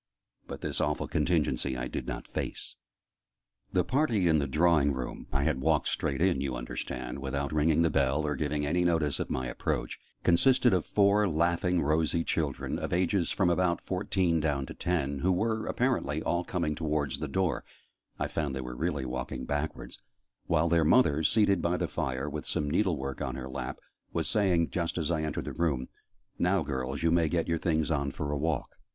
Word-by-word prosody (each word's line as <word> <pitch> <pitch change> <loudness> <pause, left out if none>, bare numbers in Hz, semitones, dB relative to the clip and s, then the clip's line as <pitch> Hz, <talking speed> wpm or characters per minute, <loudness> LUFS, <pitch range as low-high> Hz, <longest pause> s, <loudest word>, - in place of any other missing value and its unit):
But - - -7
this - - -1
awful - - 0
contingency 75 -6 +1
I - - -3
did - - -5
not - - -5
face. - - -5 1.0
The - - +2
party 120 - +1
in 80 -2 +4
the 70 - -1
drawing 75 0 +3
room 65 -1 -5
I 70 +1 +1
had 65 - 0
walked 80 +2 +2
straight 70 +2 -1
in, 90 -8 +2
you 70 -2 -2
understand, - - -5
without 70 +1 -3
ringing 75 +2 +3
the 80 - +2
bell, 70 +3 +1
or 75 -1 -1
giving 75 +1 -1
any 90 +5 +1
notice 80 -4 +1
of - - -3
my 65 - -2
approach - - -3 0.2
consisted 125 +7 +4
of 90 -3 +1
four 100 0 +3
laughing 85 +2 +1
rosy 80 +2 +1
children, 75 -5 -2
of - - -4
ages 90 0 +1
from 90 -3 +2
about 85 0 +2
fourteen 90 -3 0
down 75 -3 0
to - - -8
ten, 70 -6 -1
who 95 +6 +2
were, 110 +4 0
apparently, 100 - 0
all 85 +1 0
coming 85 -4 -1
towards 75 -2 -1
the - - -3
door 90 +4 0 0.5
(I - - -1
found 70 -4 -2
they 65 - -3
were 60 -1 -6
really 75 -1 -1
walking 60 - -4
backwards), 75 +2 -4 0.5
while 85 0 +2
their 85 -1 +3
mother, 80 - +4
seated 100 -1 +3
by 85 +1 +1
the - - -1
fire 65 +2 -2
with 75 +1 -5
some 75 - -1
needlework 75 -8 0
on 65 -2 -2
her 65 0 -5
lap, 65 -1 -5 0.3
was - - 0
saying, 90 -6 +2
just 85 -2 -2
as 80 -2 -1
I 80 -2 0
entered 75 -1 -3
the - - -5
room, 75 -7 -1 0.5
"Now, 90 -1 +2
girls, 65 0 -3
you 85 - +3
may 85 -2 +3
get 85 +1 0
your 85 -1 0
things 80 -1 0
on 70 -2 0
for 70 +1 -4
a - - -1
walk." 80 +2 -2
80 Hz, 195 wpm, -29 LUFS, 70-90 Hz, 1.0 s, in